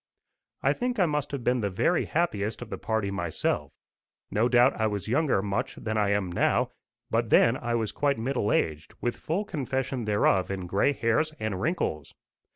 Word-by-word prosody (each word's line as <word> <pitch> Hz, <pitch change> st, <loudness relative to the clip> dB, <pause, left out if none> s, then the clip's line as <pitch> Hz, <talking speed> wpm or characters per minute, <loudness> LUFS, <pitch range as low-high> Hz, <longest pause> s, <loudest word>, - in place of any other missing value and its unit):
I -, -, +4 dB
think 245 Hz, 0 st, -2 dB
I 185 Hz, -, +4 dB
must 150 Hz, -3 st, -1 dB
have 140 Hz, -4 st, -4 dB
been 125 Hz, 0 st, +2 dB
the 100 Hz, -, 0 dB
very 160 Hz, -, +1 dB
happiest 115 Hz, -10 st, -1 dB
of 115 Hz, -, -13 dB
the -, -, -4 dB
party 110 Hz, -3 st, -1 dB
myself. 85 Hz, -5 st, -2 dB, 0.6 s
No 115 Hz, +4 st, +2 dB
doubt 125 Hz, +2 st, +5 dB
I 110 Hz, -, +3 dB
was 105 Hz, -1 st, -3 dB
younger 130 Hz, -4 st, +2 dB
much 100 Hz, -1 st, -2 dB
than 110 Hz, 0 st, -4 dB
I 105 Hz, -2 st, +2 dB
am 100 Hz, -3 st, 0 dB
now, 85 Hz, -, +1 dB, 0.4 s
but 115 Hz, 0 st, +1 dB
then 115 Hz, +3 st, +5 dB
I 120 Hz, -2 st, -2 dB
was 110 Hz, -3 st, -1 dB
quite 140 Hz, -1 st, +1 dB
middle 115 Hz, -2 st, -1 dB
aged, 75 Hz, -1 st, -1 dB
with 120 Hz, -, -1 dB
full 185 Hz, +7 st, -2 dB
confession 135 Hz, -, -2 dB
thereof 105 Hz, -3 st, +2 dB
in 95 Hz, -2 st, -3 dB
gray 100 Hz, +10 st, +2 dB
hairs 140 Hz, +6 st, +1 dB
and 110 Hz, -4 st, -2 dB
wrinkles. 110 Hz, -, -2 dB
115 Hz, 185 wpm, -27 LUFS, 100-140 Hz, 0.6 s, doubt